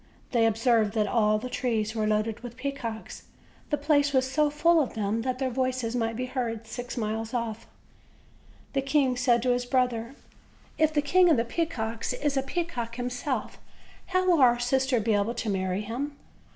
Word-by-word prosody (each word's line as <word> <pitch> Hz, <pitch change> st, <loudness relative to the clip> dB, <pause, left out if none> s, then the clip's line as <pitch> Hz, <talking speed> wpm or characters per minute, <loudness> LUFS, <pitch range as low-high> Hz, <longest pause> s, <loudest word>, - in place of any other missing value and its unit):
They 230 Hz, -2 st, +4 dB
observed 225 Hz, -1 st, +2 dB
that 215 Hz, -1 st, +2 dB
all 215 Hz, -1 st, +2 dB
the 220 Hz, -, -5 dB
trees 225 Hz, -4 st, -1 dB
were 215 Hz, -2 st, 0 dB
loaded 215 Hz, +1 st, 0 dB
with 240 Hz, 0 st, -9 dB
peacocks; 255 Hz, -5 st, -5 dB, 0.4 s
the 295 Hz, -, +1 dB
place 285 Hz, -1 st, +2 dB
was 260 Hz, -1 st, +3 dB
so 295 Hz, +3 st, +2 dB
full 325 Hz, +3 st, +4 dB
of 260 Hz, -, -3 dB
them 215 Hz, +1 st, -1 dB
that 255 Hz, +1 st, -2 dB
their 260 Hz, -1 st, -1 dB
voices 255 Hz, -2 st, -1 dB
might 230 Hz, -1 st, -1 dB
be 250 Hz, +2 st, -2 dB
heard 235 Hz, -3 st, -3 dB
six 245 Hz, +3 st, -6 dB
miles 220 Hz, +1 st, -2 dB
off. 230 Hz, -2 st, -3 dB, 1.1 s
The 275 Hz, -, +1 dB
king 270 Hz, -2 st, +2 dB
said 245 Hz, -2 st, +2 dB
to 255 Hz, -, +2 dB
his 245 Hz, 0 st, 0 dB
brother: 245 Hz, -1 st, 0 dB, 0.6 s
"If 315 Hz, 0 st, +4 dB
the 295 Hz, -1 st, +1 dB
King 360 Hz, +4 st, +5 dB
of 315 Hz, -, +5 dB
the 230 Hz, -, +1 dB
Pea 330 Hz, +7 st, -1 dB
cocks 225 Hz, -6 st, -3 dB
is 290 Hz, -1 st, -1 dB
a 270 Hz, -, +2 dB
peacock 265 Hz, -6 st, -3 dB
himself, 250 Hz, 0 st, -3 dB, 0.5 s
how 370 Hz, 0 st, +1 dB
will 345 Hz, -5 st, +4 dB
our 240 Hz, -2 st, +6 dB
sister 260 Hz, +1 st, +1 dB
be 220 Hz, +1 st, +1 dB
able 205 Hz, +3 st, +1 dB
to 230 Hz, -2 st, -3 dB
marry 190 Hz, 0 st, -1 dB
him? 265 Hz, +7 st, -4 dB
245 Hz, 190 wpm, -27 LUFS, 225-275 Hz, 1.1 s, our